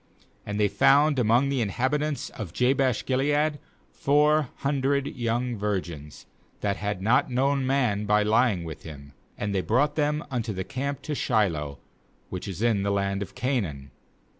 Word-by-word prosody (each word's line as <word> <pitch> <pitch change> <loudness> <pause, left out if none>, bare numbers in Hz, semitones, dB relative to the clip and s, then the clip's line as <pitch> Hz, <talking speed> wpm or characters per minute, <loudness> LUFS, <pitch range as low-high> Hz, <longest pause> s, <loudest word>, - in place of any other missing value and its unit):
^And 105 0 -3
they 105 -1 +3
'found 140 +8 +4
among 120 +4 +3
the 135 -3 0
inhabitants 140 +7 -1
of 95 -7 -7
Jabesh 130 -1 +1
gilead 145 +3 +1 0.3
four 150 0 +2 0.2
hundred 140 0 +1
young 120 -2 -2
virgins, 90 -8 -4 0.4
that 100 -1 0
had 100 -2 -3
not 115 +6 +3
known 135 +1 +1
man 125 -7 +1
by 105 0 +3
lying 105 -3 +2
with 80 -2 -7
him; 70 -2 -11 0.2
and 100 0 -2
they 95 - +1
brought 145 +9 +1
them 150 +1 0
unto 115 -4 -2
the 95 0 -3
camp 140 +6 -4
to 155 - -3
Shiloh, 85 - 0 0.5
which 90 +2 -5
is 95 +2 -4
in 115 -4 +2
the 100 - 0
land 100 0 0
of 100 - -6
Canaan. 100 - -2
120 Hz, 160 wpm, -26 LUFS, 100-140 Hz, 0.5 s, found